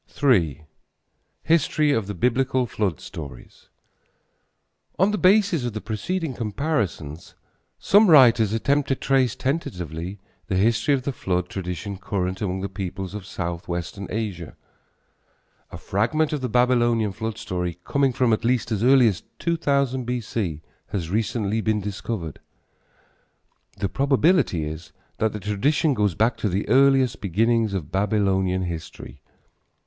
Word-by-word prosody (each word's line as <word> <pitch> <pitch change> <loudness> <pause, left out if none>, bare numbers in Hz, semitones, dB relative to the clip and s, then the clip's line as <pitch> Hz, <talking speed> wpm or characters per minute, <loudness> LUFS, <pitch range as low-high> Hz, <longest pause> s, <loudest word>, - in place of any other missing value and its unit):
III. 80 - +3 0.8
HISTORY 155 -1 +2
OF 115 -7 0
THE 105 - -5
BIBLICAL 125 +5 +1
FLOOD 100 - -2
STORIES. 70 -6 -10 1.3
On 190 +3 +3
the 210 - -1
basis 190 - +4
of 120 -3 -3
the 110 - -3
preceding 140 - -3
comparisons 105 - -3 0.4
some 205 0 +5
writers 120 -8 +6
attempt 140 +6 +1
to 135 - +1
trace 130 -4 +1
tentatively 90 - -3 0.3
the 95 - -1
history 115 +7 +2
of 130 - -4
the 140 - -1
flood 90 -5 -2
tradition 95 +1 -5
current 95 -1 -3
among 95 -2 -2
the 100 - -2
peoples 95 0 -5
of 105 -3 -7
southwestern 85 +2 -4
Asia. 100 -7 -4 1.2
A - - -7
fragment 150 +11 0
of 150 - -2
the 125 - -2
Babylonian 120 -3 +2
flood 110 +2 -5
story, 90 -2 -3
coming 140 -1 +2
from 120 -2 +2
at 110 - -1
least 120 0 0
as 105 -2 -1
early 130 -1 +6
as 95 -5 -1 0.2
2000 140 -6 0
B.C., 110 -10 -3 0.2
has 85 -4 -4
recently 110 0 0
been 110 -1 +1
discovered. 100 - -5 1.4
The 100 0 -1
probability 140 - +2
is 80 +2 -8 0.3
that 110 0 +1
the 105 - -6
tradition 135 - +1
goes 105 -7 0
back 115 +6 +1
to 105 - -1
the 95 +3 -2
earliest 135 0 +4
beginnings 110 +2 +1
of 85 -5 -5
Babylonian 95 -2 +1
history. 85 -3 -7
110 Hz, 135 wpm, -23 LUFS, 95-130 Hz, 1.4 s, writers